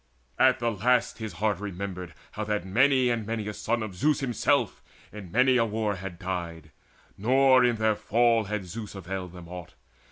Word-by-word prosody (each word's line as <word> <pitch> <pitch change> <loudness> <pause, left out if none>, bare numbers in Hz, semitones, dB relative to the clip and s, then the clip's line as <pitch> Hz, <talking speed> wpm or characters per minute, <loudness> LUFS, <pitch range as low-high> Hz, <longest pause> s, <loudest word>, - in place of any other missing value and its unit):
At - - +5
the 120 0 0
last 120 +3 +1
his 110 -2 -5
heart 100 +1 -1
Remembered 90 -4 -6 0.2
how 110 - -4
that 105 -3 -2
many 125 +5 +3
and 115 -2 -1
many 110 0 -3
a 105 - -3
son 115 +2 -1
Of 105 -3 -6
Zeus 145 +10 +1
himself 125 -5 0 0.3
in 100 -5 -10
many 130 +4 +4
a 115 - +3
war 105 -2 -2
had 95 -1 -7
died, 85 -4 -5 0.5
Nor 130 +3 +5
in 120 -1 +3
their 110 -1 +1
fall 115 +1 +2
had 105 -1 -3
Zeus 105 +3 -7
availed 95 -1 -6
them 90 -2 -11
aught. 90 -5 -9
105 Hz, 185 wpm, -27 LUFS, 95-120 Hz, 0.5 s, At